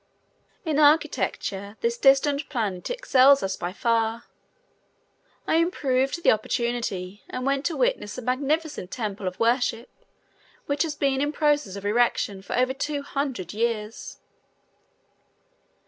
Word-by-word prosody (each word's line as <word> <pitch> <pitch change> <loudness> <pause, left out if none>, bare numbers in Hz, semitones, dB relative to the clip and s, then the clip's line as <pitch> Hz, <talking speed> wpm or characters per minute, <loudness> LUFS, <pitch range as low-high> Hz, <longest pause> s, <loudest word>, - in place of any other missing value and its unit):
In 305 -2 0
architecture 215 -9 +1
this 235 0 +1
distant 275 +3 +3
planet 210 -10 -3
excels 280 - +4
us 190 0 -1
by 175 0 -4
far. 230 +2 0 1.2
I - - +2
improved 280 -3 0
the - - +6
opportunity 215 -4 -2
and 255 0 -4
went 275 +1 0
to 335 - -3
witness - - 0
a 250 - -6
magnificent 285 - -1
temple 210 -4 -4
of 180 - -5
worship 235 0 +1 0.7
which 285 0 -1
has 315 -3 0
been 275 -2 +1
in 290 +1 0
process 295 -10 +1
of 200 0 -8
erection 210 -3 +1
for 195 - -4
over 255 +1 +2
two 285 +1 -3
hundred 270 - -3
years. 225 -1 -3
255 Hz, 130 wpm, -25 LUFS, 215-285 Hz, 1.2 s, the